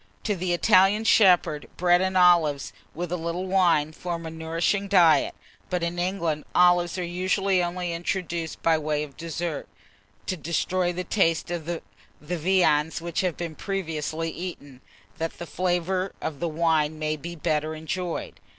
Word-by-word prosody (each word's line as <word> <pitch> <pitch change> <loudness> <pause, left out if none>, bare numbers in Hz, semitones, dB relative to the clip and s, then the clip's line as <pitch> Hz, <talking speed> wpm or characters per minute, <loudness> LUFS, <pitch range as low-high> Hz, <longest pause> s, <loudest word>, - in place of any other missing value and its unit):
To 210 - 0
the 180 0 -2
Italian 195 +3 +4
shepherd, 180 -9 +4
bread 175 0 +4
and 190 0 0
olives, 170 -6 +4 0.2
with 175 +1 -4
a - - +1
little 170 +2 -3
wine, 175 -5 +3
form 170 0 -5
a 160 - -5
nourishing 165 +5 -1
diet; 175 -5 +4 0.3
but 180 -2 -1
in 170 +1 -2
England, 170 -5 -1
olives 175 -1 +4
are 180 - -2
usually 185 +2 +1
only 175 0 -2
introduced 170 -2 -3
by 165 -1 +3
way 150 -1 -1
of 140 -3 -10
dessert, 165 -2 -4 0.6
to 185 - -2
destroy 175 +3 -1
the 180 +1 -4
taste 170 -3 +1
of 170 -2 -4
the 170 -1 -3 0.4
viands 160 -1 +1
which 170 0 -2
have 180 -3 -1
been 170 -2 -4
previously 165 -3 -3
eaten, 145 -7 -8 0.4
that 165 0 -3
the 175 - -6
flavour 185 +2 -1
of 150 -3 -5
the 170 - -1
wine 155 -1 +1
may 155 0 -1
be 170 +3 -7
the 160 - -17
better 155 -1 0
enjoyed. 170 +2 -4
170 Hz, 160 wpm, -25 LUFS, 160-180 Hz, 0.6 s, Italian